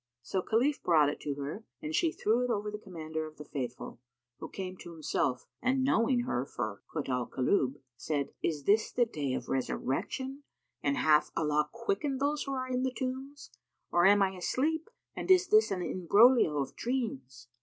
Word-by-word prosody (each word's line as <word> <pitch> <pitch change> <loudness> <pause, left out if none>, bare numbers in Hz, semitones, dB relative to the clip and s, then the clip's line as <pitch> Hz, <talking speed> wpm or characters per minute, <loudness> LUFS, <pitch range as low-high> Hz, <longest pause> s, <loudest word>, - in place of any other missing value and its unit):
So 190 +8 -1
Khalif 250 +9 +1
brought 155 -4 +4
it 145 - -5
to 145 -1 -3
her 145 +10 -5 0.2
and 310 0 -5
she 330 +1 +2
threw 230 -1 +1
it 250 - -1
over 210 -2 -1
the 210 - -6
Commander 160 -5 -5
of 155 - -14
the 150 - -9
Faithful, 125 -5 -5 0.4
who - - -7
came 185 -1 -5
to 175 - -10
himself 140 -5 -1 0.2
and 260 +2 +2
knowing 245 -1 +3
her 130 - -1
for 110 -6 -5
Kut 150 -3 -3
al 125 -2 -1
Kulub, 130 0 +1 0.2
said, 145 0 -2
"Is 150 -4 -1
this 210 +7 +3
the 245 - +3
Day 145 - -3
of - - -5
Resurrection 260 - -2 0.4
and 140 0 0
hath 150 -1 +4
Allah 150 -1 +1
quickened 235 +4 -2
those 290 +2 0
who 275 - -4
are 255 -1 -2
in 255 0 -1
the 260 - +1
tombs; 265 +2 -5 0.4
or 175 +2 +5
am 200 0 +6
I 190 - +1
asleep 295 - -1 0.3
and - - -5
is 370 0 +6
this 430 +1 +5
an 185 -2 -2
imbroglio 200 - +4
of 140 -2 -2
dreams?" 135 - -3
195 Hz, 185 wpm, -31 LUFS, -, 0.4 s, am